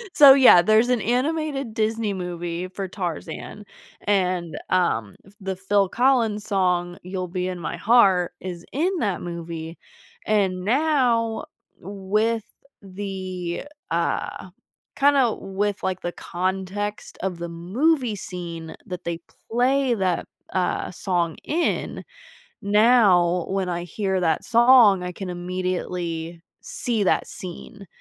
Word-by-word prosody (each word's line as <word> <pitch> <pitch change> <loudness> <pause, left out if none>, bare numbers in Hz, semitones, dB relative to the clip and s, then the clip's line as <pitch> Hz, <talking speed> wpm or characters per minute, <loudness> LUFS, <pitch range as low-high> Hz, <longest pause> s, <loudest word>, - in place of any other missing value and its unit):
So, 285 -4 +10
yeah, 255 -10 +8
there's 215 +5 +4
an 245 -3 +2
animated 275 +1 -1
Disney 220 -1 0
movie 175 -1 -4
for 190 0 -5
Tarzan 180 +1 -6 0.4
and, 180 -4 0
um, 115 - +1 0.3
the 190 0 -3
Phil 195 +1 +1
Collins 235 -4 +2
song, 180 -3 0
"You'll 185 0 -4
Be 180 +1 -3
In 180 -1 -4
My 165 - -4
Heart," 195 -6 +4
is 175 -2 -7
in 360 +7 0
that 200 -5 -1
movie; 170 -1 -6 0.5
and 190 -4 +1
now 245 -3 +1 0.3
with 205 +4 -1 0.4
the, 185 -1 -5 0.3
uh, 170 +2 -2 0.5
kinda 275 -5 +3
with, 200 +1 -3
like, 185 -1 -2
the 175 - -3
context 190 +4 -4
of 185 -2 -2
the 170 0 -4
movie 235 - 0
scene 170 -5 -7
that 180 -1 -6
they 170 0 -3 0.3
play 255 +2 +2
that, 185 -4 -1 0.3
uh, 185 -1 0
song 175 -3 -1
in, 335 +3 -1 0.6
now 200 -5 +4
when 190 -1 -1
I 175 0 -2
hear 190 +2 -2
that 165 -3 +1
song, 235 -5 +6
I 180 - -4
can 190 0 -6
immediately 175 -2 -4 0.2
see 225 -4 -2
that - - +1
scene 195 +3 -9
190 Hz, 120 wpm, -23 LUFS, 175-225 Hz, 0.6 s, So